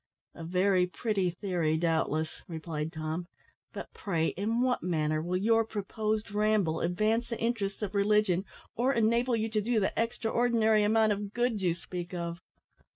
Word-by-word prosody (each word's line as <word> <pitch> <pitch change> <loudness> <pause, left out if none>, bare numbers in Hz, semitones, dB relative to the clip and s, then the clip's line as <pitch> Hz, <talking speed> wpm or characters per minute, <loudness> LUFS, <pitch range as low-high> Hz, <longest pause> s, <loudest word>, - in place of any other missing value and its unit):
"A 165 - -9
very 180 +2 +2
pretty 195 -1 -1
theory, 175 -3 -1
doubtless," 160 -1 0
replied 160 -2 -4
Tom; 160 +1 -4 0.4
"but, - - -8
pray, 165 -5 0
in 225 +5 -1
what 255 -1 +1
manner 155 -3 0
will 175 +3 -1
your 225 +4 +3
proposed 215 0 -3
ramble 205 -6 +1
advance 215 +7 +1
the 230 - -3
interests 215 -3 -1
of 200 -1 -3
religion, 200 -2 +3 0.3
or 250 +3 +2
enable 235 +2 +2
you 225 0 0
to 215 -1 0
do 230 +1 +1
the 190 - 0
extra 230 -1 -1
ordinary 225 -3 +3
amount 220 +1 +3
of 205 0 -3
good 240 -3 0
you 175 -3 +1
speak 175 +1 -6
of?" 170 0 -4
200 Hz, 160 wpm, -30 LUFS, 175-220 Hz, 0.4 s, your